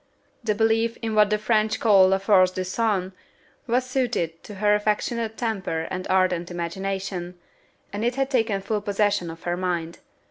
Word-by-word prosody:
The 215 -2 0
belief 225 +1 +1
in 225 -1 -2
what 210 -1 +4
the 210 - +2
French 215 0 +1
call 200 -4 +6
la 190 +1 +3
force 195 -2 +4
du 185 0 -4
sang 190 -1 -1 0.6
was 250 +2 +1
suited 235 -11 -2
to 210 - -9
her 210 +1 +2
affectionate 220 +2 -1
temper 190 -8 -2
and 185 0 -4
ardent 185 -2 +1
imagination, 180 +1 -4 0.6
and 205 +2 -3
it 240 +1 0
had 270 0 -1
taken 225 -6 +1
full 210 +1 -2
possession 205 -3 0
of 165 0 -10
her 175 0 -1
mind. 175 -2 -3
205 Hz, 170 wpm, -24 LUFS, 185-225 Hz, 0.6 s, call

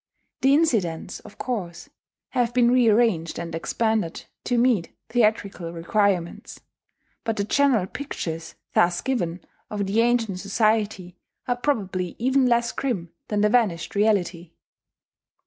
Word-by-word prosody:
The 270 +1 +5
incidents, 200 - 0
of - - -15
course, 190 -9 -4 0.4
have 240 -1 0
been 240 -1 +4
rearranged 225 -8 +3
and 170 -1 -5
expanded 215 +1 -1 0.2
to 245 - +1
meet 235 -8 +2 0.2
theatrical 210 -6 0
requirements; 175 +1 -1 0.6
but 225 -1 -2
the 200 - +1
general 250 -3 +2
pictures 165 - -6 0.2
thus 175 0 +3
given 185 -10 -2 0.3
of 205 -1 -2
the 205 +4 +2
ancient 230 -5 +1
society 205 -3 0 0.3
are 245 - +1
probably 195 - -1
even 260 +2 +2
less 235 -1 +2
grim 195 -11 -3 0.2
than 210 -1 0
the 210 - +4
vanished 210 -8 +1
reality. 190 -5 0
210 Hz, 125 wpm, -24 LUFS, 180-240 Hz, 0.6 s, The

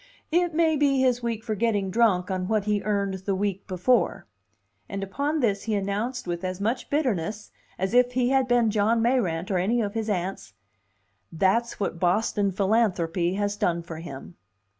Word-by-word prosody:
"It 345 -1 +1
may 320 -2 +3
be 275 -2 +3
his 250 -2 +2
week 230 -2 -3
for 225 -2 -2
getting 205 -3 0
drunk 195 -5 +2
on 185 -1 -2
what 215 -1 +1
he 210 -1 +1
earned 200 -2 -1
the 195 - +1
week 195 0 -2
before." 190 +3 +1 0.6
And 195 0 -4
upon 285 +10 -1
this 205 -5 0
he 220 -2 0
announced 205 +6 -2
with 175 0 -4
as 185 0 -3
much 230 +5 -2
bitterness 215 - -1 0.3
as 190 +3 -2
if 250 0 +4
he 250 0 +2
had 265 -1 +2
been 240 -3 +3
John 220 +2 +2
Mayrant 195 -8 0
or 185 - +2
any 220 +7 +1
of 205 -3 -1
his 225 -1 -2
aunts, 190 -1 -3 0.8
"That's 195 +8 +1
what 195 -4 -2
Boston 200 +2 +1
philanthropy 185 -4 +1
has 205 0 -1
done 170 -4 0
for 165 -2 -8
him." 135 - -9
205 Hz, 180 wpm, -26 LUFS, 185-235 Hz, 0.8 s, if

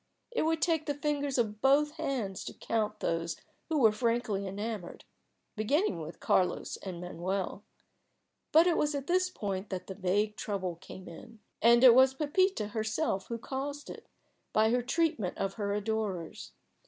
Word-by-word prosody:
It 470 - 0
would 325 0 +1
take 325 -3 +1
the 290 - 0
fingers 285 -2 -1
of 215 -3 0
both 290 +2 +4
hands 230 -11 -3
to - - -7
count 220 -2 -2
those 165 0 -1 0.3
who 320 - +1
were 225 -6 +6
frankly 225 -3 0
enamoured, 205 -1 -5 0.5
beginning 235 - +1
with 160 +2 -8
Carlos 180 -1 +1
and 185 -3 -7
Manuel. 185 +3 -3 0.9
But 320 +2 +7
it 350 -2 +3
was 295 0 +1
at 275 -1 -3
this 365 +2 +2
point 200 - -4
that 185 -1 -4
the 190 - -6
vague 205 +3 0
trouble 185 -5 -3
came 190 +1 -11
in. 225 +7 -11 0.2
And 235 +2 +6
it 250 -3 +10
was 260 +1 +6
Pepita 300 - +1
herself 215 -1 -1
who 235 - -3
caused 280 +4 -5
it, - - -11 0.5
by 220 +1 +4
her 245 +1 +2
treatment 265 - 0
of 195 0 -1
her 200 -2 -2
adorers. 205 -5 -3
220 Hz, 165 wpm, -31 LUFS, 195-285 Hz, 0.9 s, it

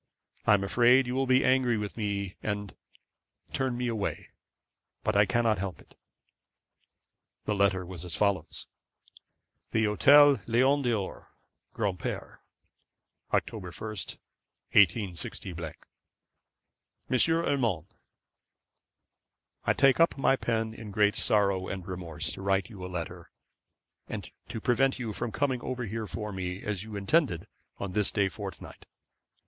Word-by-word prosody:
I 105 - +7
am 100 - -1
afraid 120 +6 +5
you 125 - -3
will 135 +1 0
be 130 0 +4
angry 130 -3 +3
with 105 -1 -4
me, 100 -3 -2
and 105 -2 -3 0.8
turn 130 -2 -1
me 125 0 -1
away; 110 -4 -3 0.7
but - - 0
I 100 0 +5
cannot 115 -4 +2
help 95 -2 -4
it.' - - -19 1.5
The 105 - 0
letter 100 -2 +2
was 90 -2 -7
as 90 -3 -4
follows: 100 -3 0 1.0
'The 110 - +1
Hotel 140 +6 +6
Lion 130 +5 +3
d'Or, 115 -7 -3 0.4
Granpere, 100 -5 -3 0.9
October 100 -5 -1
1, 110 +5 -6 0.8
186. 95 -3 +2
'M. 85 -4 -6 1.4
URMAND, 130 - +2 1.8
'I - - +4
take 135 +1 +4
up 165 -2 +4
my 135 0 +3
pen 110 -3 -1
in 110 -1 -9
great 105 +1 +3
sorrow 100 -3 +2
and 95 -2 -5
remorse 85 -3 -4
to - - -7
write 95 0 0
you 95 -4 -9
a - - -4
letter, 85 0 -5 0.8
and - - -6 0.2
to 115 - -5
prevent 130 +4 +2
you 115 -4 -4
from 120 +2 -3
coming 130 -2 0
over 125 -1 -3
here 110 +1 -4
for 105 +1 -5
me, 95 -1 -4
as 105 -3 -2
you 110 -1 -8
intended, 100 - +1 0.3
on 100 -2 -4
this 105 +1 +2
day 100 -2 +2
fortnight. 85 - -9
105 Hz, 130 wpm, -29 LUFS, 95-125 Hz, 1.8 s, I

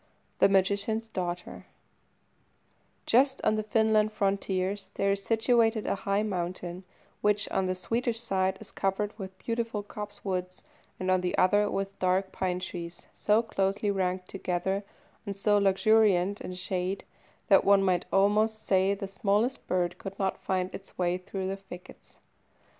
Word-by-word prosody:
THE - - +6
MAGICIAN'S 200 +4 +1
DAUGHTER 180 -3 -5 1.4
Just 265 +3 +3
on - - +3
the 215 - 0
Finland 215 -1 +2
frontiers 195 -1 -1
there 195 0 +1
is 200 0 0
situated 225 0 +2
a - - +1 0.2
high 200 +1 +2
mountain, 180 -2 -4 0.4
which, 210 0 +2
on 190 -1 +1
the 185 - 0
Swedish 230 +4 -1
side, 190 -4 0
is - - -11
covered 200 +2 -1
with 190 -1 -7
beautiful 230 -1 -3
copsewood, 195 -3 -5 0.4
and 185 0 0
on 185 -1 +3
the 180 -1 -1
other 205 +3 +4
with 195 0 -3
dark 185 +1 +1
pine 180 -1 -1
trees, 175 -2 -7
so 215 +2 +2
closely 200 -1 0
ranked 185 -1 -1
together, 190 +1 -2 0.4
and 200 -1 -4
so 205 +1 +3
luxuriant 200 -1 +3
in 185 - -6
shade, 185 +1 -2 0.4
that 195 - +6
one 200 0 +5
might 180 -2 +1
almost 215 +3 +2
say 190 +1 +3
the 200 0 -5
smallest 210 +5 0
bird 180 -1 0
could 195 0 -7
not 190 -1 -1
find 185 -1 -1
its 195 - -10
way 180 0 0
through 190 +1 -5
the 195 +1 -3
thickets. 185 -2 -13
195 Hz, 150 wpm, -29 LUFS, 185-210 Hz, 1.4 s, THE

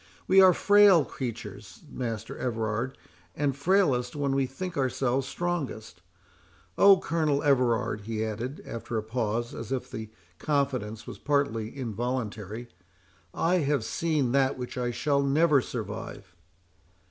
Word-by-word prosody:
"We 190 +1 +7
are 185 -1 +8
frail 200 -5 +6
creatures, 105 -7 -7
Master 115 -5 -5
Everard, 115 +1 -2 0.4
and 140 -2 0
frailest 140 -6 +2
when 140 -2 0
we 135 -1 +1
think 180 +8 -6
ourselves 130 -1 0
strongest. 130 - -4 0.7
Oh, 200 -1 +7
Colonel 155 -4 0
Everard," 125 -6 +2
he 110 +1 -3
added, 115 +6 -5
after 115 0 -5
a 110 - -1
pause, 115 +1 -2
and - - -7
as 115 0 -7
if 130 -2 -3
the 110 -1 -6 0.3
confidence 130 -7 -1
was - - -9
partly 140 -5 -1
involuntary, 115 -2 -4 0.6
"I 175 - +1
have 145 -6 +1
seen 150 0 0
that 135 0 +2
which 125 -1 -6
I 125 -1 -1
shall 140 +4 +1
never 145 +1 +3
survive!" 85 -6 -7
130 Hz, 135 wpm, -28 LUFS, 115-145 Hz, 0.7 s, are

